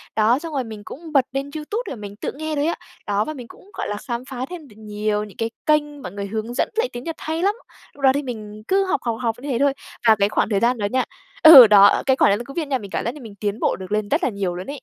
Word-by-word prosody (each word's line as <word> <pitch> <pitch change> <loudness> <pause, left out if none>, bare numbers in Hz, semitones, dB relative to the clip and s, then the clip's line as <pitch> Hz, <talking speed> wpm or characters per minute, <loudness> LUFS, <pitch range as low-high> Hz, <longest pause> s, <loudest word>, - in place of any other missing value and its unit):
Đó, 225 +5 +3
xong 330 -1 -7
rồi 265 -2 -1
mình 220 -2 -9
cũng 320 +2 -9
bật 265 -2 +4
lên 275 +1 -3
YouTube 360 +10 -3
là - - -4
mình 205 -2 -9
tự - - -4
nghe 310 0 -4
thôi 290 +1 0
á. 335 - 0 0.3
Đó, 205 +1 +1
và 310 - -4
mình 250 -5 -9
cũng, 405 - -17
gọi - - -4
là, 205 - -3
khám 240 0 -3
phá 260 0 -4
thêm 335 -5 -9
được 210 - -18
nhiều 210 0 -2
những 210 - -12
cái 225 0 -1 0.2
kênh 295 -2 +1
mọi 180 - -7
người 200 0 -5
hướng 220 +3 -4
dẫn - - 0
lại 470 +2 +1
tiếng 245 - -6
Nhật 330 -1 -5
hay 320 +2 -3
lắm. 405 +2 +2 0.4
Lúc 285 - -16
đó 265 - +7
thì 285 +1 -1
mình 215 -4 -7
cứ 390 0 +2
học, 375 - 0
học, 230 -2 -2
học 225 -2 0
như 285 - -6
thế 240 - 0
thôi. 280 -1 +3 0.3
Và 220 - +7
cái 200 +1 +3
khoảng - - 0
thời 200 -2 +1
gian 240 +2 +2
đó 205 - -2
nha 255 0 +2 0.4
ừ, 280 -8 +12
đó, 205 -1 +7
ờ, - - +2
cái 265 -1 +3
khoảng - - +5
đang 240 - -7
Covid 295 +2 -4
nha 270 -2 0
mình 200 -5 -10
cảm - - -2
giác 235 - -2
là 295 - -11
mình 215 -4 -11
tiến 210 +1 -2
bộ - - +1
được 190 +1 -9
lên 210 -1 -1
rất 325 +5 +1
là - - +2
nhiều 195 -4 -3
luôn 180 - -7
ấy. 290 - -4
245 Hz, 310 wpm, -22 LUFS, 210-295 Hz, 0.4 s, ừ